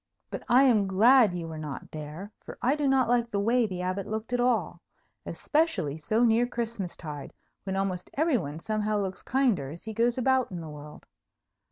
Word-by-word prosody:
But - - -4
I 255 +3 +6
am 220 -7 +4
glad 215 +1 +5
you 170 -2 -4
were 160 -1 -7
not 150 -3 -7
there; 155 +6 -7
for - - -9
I 265 +4 +2
do 295 -2 0
not 265 -2 +3
like 235 0 +2
the 205 - -1
way 230 +3 +2
the 180 -2 -5
Abbot 185 +2 -2
looked 220 +3 -4
at 245 - +1
all, 245 -1 0 0.5
especially 300 - 0
so 215 +10 +1
near 235 +1 +4
Christmas 230 -6 -4
tide, 150 -4 -7 0.3
when 190 -1 -2
almost 190 -2 -2
every 305 -4 +2
one 145 -3 -6
somehow 215 +2 -1
looks 190 -2 -3
kinder 245 - +1
as 165 +4 -9
he 220 - -6
goes 235 +2 +1
about 260 0 +2
in 180 - -6
the 160 -2 -7
world. 150 0 -11
215 Hz, 200 wpm, -28 LUFS, 180-245 Hz, 0.5 s, I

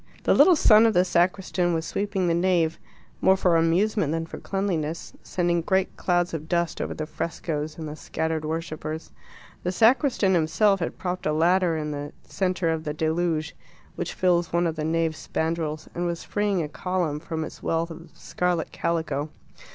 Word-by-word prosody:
The - - +4
little 365 - +7
son 225 -6 +6
of 225 - +1
the 180 +1 +5
sacristan 180 0 +1
was 160 0 -2
sweeping 200 -2 -1
the 170 - +2
nave, 170 -2 +1 0.4
more 190 0 +5
for 180 -3 +3
amusement 165 +1 +2
than 165 0 -1
for - - -9
cleanliness, 170 -5 -2
sending 175 -1 0
great 190 +2 0
clouds 175 -1 0
of 160 0 -5
dust 170 -1 0
over - - -3
the 155 - -3
frescoes 155 -1 -4
and 160 -1 -5
the 150 - -6
scattered 160 0 -3
worshippers. 155 0 -4 0.5
The 180 - -1
sacristan 230 -1 +3
himself 175 +5 +3
had 165 - -3
propped 180 -2 -3
a 155 - +1
ladder 170 +1 +3
in 150 -1 -3
the 145 0 -5
centre 180 -3 -1
of 160 -1 -2
the 150 -2 -4
Deluge 160 0 -1 0.4
which - - -4
fills 175 -2 +2
one 170 +1 +2
of 165 -2 -1
the 155 - -3
nave 160 0 0
spandrels 160 -1 -3
and 175 0 -2
was 170 -1 -3
freeing 205 -4 0
a - - -3
column 175 -2 -2
from 160 0 -4
its - - -9
wealth 165 +1 -1
of 165 +1 -10
scarlet 180 -2 -2
calico. 160 -3 -2
170 Hz, 180 wpm, -25 LUFS, 160-185 Hz, 0.5 s, little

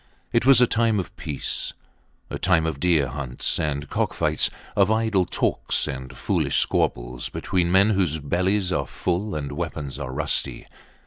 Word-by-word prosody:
It 115 +2 +2
was 135 -3 +8
a 125 - +7
time 115 -2 +2
of 90 - -6
peace. 75 -2 -3 0.6
A - - -4
time 85 -3 +3
of 80 -4 -2
deer 80 -5 +3
hunts 65 -1 -2
and 75 -2 -2
cock - - -1
fights; - - +1 0.3
of 100 0 +4
idle 110 -4 +2
talks - - 0
and 65 -1 -6
foolish - - 0
squabbles - - 0
between 90 -2 -1
men 100 +3 +5
whose 90 -6 +1
bellies 90 +6 0
are 70 -7 -1
full 95 +3 -2
and 70 -2 -4
weapons 75 -3 -4
are 65 - -4
rusty. 75 +3 -2
85 Hz, 165 wpm, -24 LUFS, 70-100 Hz, 0.6 s, was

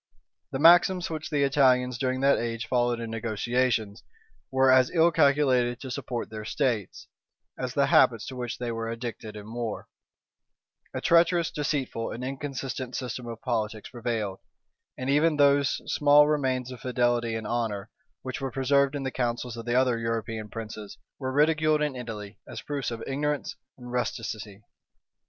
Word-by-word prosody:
The - - -2
maxims 175 +3 +5
which 160 +1 -4
the 145 -3 +1
Italians 125 -3 +3
during 130 -1 -1
that 140 +1 +4
age 115 -1 -3
followed 120 0 +1
in 115 -1 -5
negotiations, 115 -1 -1 0.5
were 130 0 +4
as 130 -1 +5
ill 170 0 +4
calculated 140 -6 +3
to 130 - -7
support 125 -4 -4
their 110 -1 -6
states, 110 - -2 0.5
as - - -4
the - - +4
habits - - +4
to 130 - -7
which 120 -3 -4
they 120 -1 -3
were 115 0 -3
addicted 115 -2 -6
in 105 +1 -9
war: 115 -3 -4 1.0
a - - -4
treacherous, 170 0 +3
deceitful, 140 -6 -2
and 120 - -6
inconsistent 135 -1 -4
system 125 -1 -4
of 115 +2 -8
politics 110 -4 -2
prevailed; 110 -5 -3 0.6
and 130 - -4
even 150 +3 +3
those 140 -1 +4
small 145 0 +5
remains 130 -4 0
of 125 - -8
fidelity 120 -2 +1
and 110 -1 -4
honor, 110 -3 -2 0.3
which 130 +3 -5
were 135 - -2
preserved 140 +2 +2
in 140 - -3
the 130 - -2
councils 120 -1 -2
of 115 -1 -7
the 120 - +1
other 125 -2 +3
European 115 -1 -3
princes, 110 -2 -7 0.2
were 130 -2 -3
ridiculed 155 +1 +3
in 150 -3 -1
Italy, 105 -4 -7
as - - -8
proofs 145 -3 -3
of 115 -1 -6
ignorance 145 +2 -2 0.2
and 125 -1 -10
rusticity. 110 -4 -4
125 Hz, 160 wpm, -27 LUFS, 115-140 Hz, 1.0 s, maxims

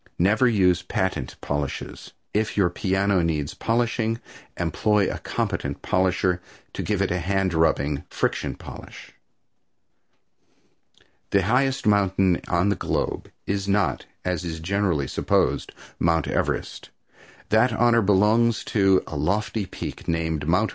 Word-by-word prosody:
Never 105 +8 +3
use 90 -6 +3
patent 90 -7 -2
polishes. 70 -1 -4 0.2
If 110 0 0
your 90 -4 +3
piano 95 -1 +1
needs 75 -3 -1
polishing 115 -1 0 0.4
employ 100 +4 +1
a - - -6
competent - - -3
polisher 90 -1 +1 0.3
to - - -4
give 105 -2 0
it 95 - -1
a 90 - 0
hand 95 +1 0
rubbing 75 -3 +1
friction - - -1
polish. - - -11 2.2
The 100 -1 +3
highest 130 +6 +1
mountain 95 -3 +3
on 90 +3 +2
the 100 - +2
globe - - -2 0.2
is 100 0 -2
not, 100 0 0 0.2
as 90 -2 -1
is 80 -2 -4
generally 85 -5 0
supposed, - - 0 0.3
Mt. 80 -2 +2
Everest, - - -2 0.6
that 110 +4 +4
honor 115 +1 +3
belonging 105 +4 +4
to 95 -3 +2
a 80 - -7
lofty 100 +7 -1
peak - - -7
named 80 -3 -1
Mt. 105 +6 +3
95 Hz, 125 wpm, -24 LUFS, 85-105 Hz, 2.2 s, that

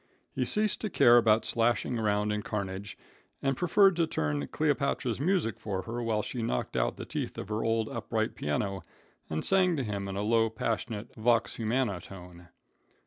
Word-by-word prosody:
He - - 0
ceased 215 -1 +1
to 215 - -1
care 120 -9 +6
about 110 -2 +4
slashing 120 +1 +1
around 105 -1 +1
in 105 0 -1
carnage, 100 -1 -4 0.4
and 135 -1 0
preferred 190 +4 +4
to 165 -2 +2
turn 75 - -1
Cleopatra's 140 - 0
music 170 - +1
for 95 -3 -3
her 120 +1 -4
while 110 -2 0
she 125 - -4
knocked 60 - -2
out - - 0
the - - -6
teeth - - -4
of 100 - -6
her 105 +1 -1
old 115 -1 +1
upright - - -2
piano 95 +6 -2 0.5
and 80 - -2
sang 185 -2 +3
to 135 - -1
him 100 -3 -3
in 95 - -4
a 100 - -2
low, 115 +1 +3
passionate, 110 0 -3
vox 115 +1 +1
humana 115 -3 0
tone. 90 -2 -12
110 Hz, 180 wpm, -29 LUFS, 100-125 Hz, 0.5 s, care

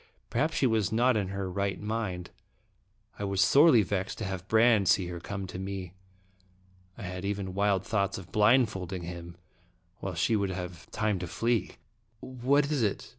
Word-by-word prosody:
Perhaps 150 +7 0
she - - +2
was 110 -5 +1
not 120 +3 +3
in 100 -3 0
her 95 0 -3
right 100 +1 -2
mind. 105 -5 -3 0.9
I - - -3
was 100 -1 -1
sorely 135 +2 +6
vexed 95 -1 -3
to - - -5
have 95 -1 -5
Brande 110 -3 +4
see 95 - +4
her 85 -1 -5
come 95 +2 -5
to 95 0 -7
me. 95 -2 -5 1.0
I 115 - -8
had 90 0 -5
even 100 -2 -3
wild 100 -1 +1
thoughts 100 -3 0
of 95 -1 -10
blindfolding 105 -5 +2
him, 85 0 -8 0.6
while 95 -2 -4
she 90 +7 +1
should 100 -3 +1
have 90 -2 -6
time 105 -3 -1
to 90 - -4
flee. 115 +6 0 0.5
"What 140 +4 +1
is 145 -4 +1
it?" 105 -3 -1
100 Hz, 175 wpm, -29 LUFS, 95-110 Hz, 1.0 s, sorely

